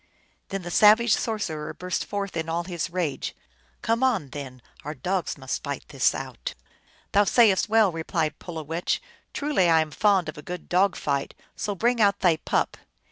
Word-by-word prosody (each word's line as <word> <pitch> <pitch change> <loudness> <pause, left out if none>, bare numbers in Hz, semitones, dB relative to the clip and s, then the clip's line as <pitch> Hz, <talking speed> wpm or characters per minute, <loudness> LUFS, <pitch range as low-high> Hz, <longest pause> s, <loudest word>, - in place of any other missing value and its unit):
Then 195 -1 -4
the 175 - -6
savage 215 +4 +6
sorcerer 175 -9 -2
burst 180 0 -3
forth 200 -2 -4
in 165 0 -2
all 170 +1 -1
his 170 -2 -3
rage 170 -6 -2
i - - -36 0.2
" 65 - -36
Come 230 +2 +1
on, 225 - +1
then, 130 -4 -8 0.2
our 150 +2 -5
dogs 180 +7 -2
must 130 -2 -4
fight 140 -2 -5
this 135 -2 +2
out! 130 -2 -6 0.2
" - - -33
" - - -33
Thou 205 - +5
sayest 210 -1 +4
well," 220 -3 +5
replied 160 -1 -2
Pulowech; 165 0 -3 0.2
" - - -38
truly 280 - +2
I 165 -1 +6
am 155 -1 -1
fond 195 -1 +3
of 155 -1 -6
a - - -7
good 175 +3 -7
dog 185 +1 +3
fight, 140 -2 -2 0.2
so 205 -2 -3
bring 235 +4 +1
out 200 -1 +3
thy 175 -4 +4
pup - - -1
175 Hz, 195 wpm, -25 LUFS, 155-205 Hz, 0.2 s, savage